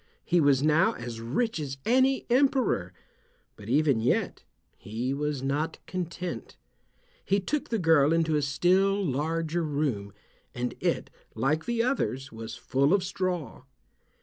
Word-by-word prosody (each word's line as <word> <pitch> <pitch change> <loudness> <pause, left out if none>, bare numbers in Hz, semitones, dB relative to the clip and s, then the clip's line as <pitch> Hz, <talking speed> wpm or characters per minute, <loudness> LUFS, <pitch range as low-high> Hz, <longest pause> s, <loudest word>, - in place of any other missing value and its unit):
He 175 -1 +3
was 140 -2 +4
now 155 +1 +4
as 120 -2 -7
rich 165 - -1
as 135 -3 -4
any 260 +3 +3
emperor, 250 - +2 0.6
but 105 +1 -11
even 140 -2 +3
yet 115 - 0 0.3
he 115 +5 -3
was 145 -1 -2
not 145 +4 -1
content. 180 -1 -5 0.7
He 200 +1 +2
took 290 +9 -2
the 230 - 0
girl 160 -5 +4
into 165 -1 +2
a 150 - +2
still 185 +8 +2
larger 160 +4 -1
room, 140 -10 -2 0.4
and 125 0 -2
it, - - -1 0.2
like 155 +4 0
the 235 -1 0
others, 145 - -1
was 110 0 -7
full 140 +7 +2
of 195 - 0
straw. 185 -4 -3
155 Hz, 140 wpm, -28 LUFS, 135-185 Hz, 0.7 s, was